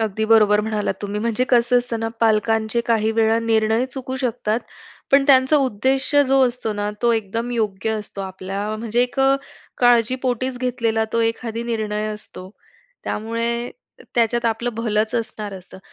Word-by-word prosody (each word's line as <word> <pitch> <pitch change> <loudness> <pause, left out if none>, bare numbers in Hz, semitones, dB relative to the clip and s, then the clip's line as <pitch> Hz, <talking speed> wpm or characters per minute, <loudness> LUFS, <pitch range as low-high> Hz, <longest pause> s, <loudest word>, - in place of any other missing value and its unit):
अगदी 220 0 -1
बरोबर 215 -2 +5
म्हणालात 210 -2 -2
तुम्ही, 205 +1 -3
म्हणजे 235 +2 0
कसं 245 0 +4
असतं 240 -2 -3
ना, 225 - -1
पालकांचे 225 +1 +2
काही 220 -2 +2
वेळा 225 0 +2
निर्णय 225 +1 +2
चुकू 260 0 -6
शकतात, 235 -3 -1 0.5
पण 275 0 +6
त्यांचा 265 +1 +5
उद्देश 265 +1 0
जो 270 0 +4
असतो 240 -3 -3
ना, 205 0 -2
तो 235 -1 +4
एकदम 225 +2 -2
योग्य 215 -2 -1
असतो. 205 -1 -7
आपल्या 195 +1 -5
म्हणजे 230 +2 0
एक 250 +2 -4
अ, 270 0 +5 0.4
काळजीपोटीच 250 +1 +2
घेतलेला 230 -3 0
तो 230 - +1
एखादी 230 0 -2
निर्णय 215 -2 -2
असतो. 190 -3 -10 0.5
त्यामुळे 230 +2 -2 0.4
त्याच्यात 235 0 +1
आपलं 230 +2 -1
भलंच 220 0 -1
असणार 220 -3 -3
असतं. 185 0 -12
230 Hz, 150 wpm, -21 LUFS, 215-245 Hz, 0.5 s, पण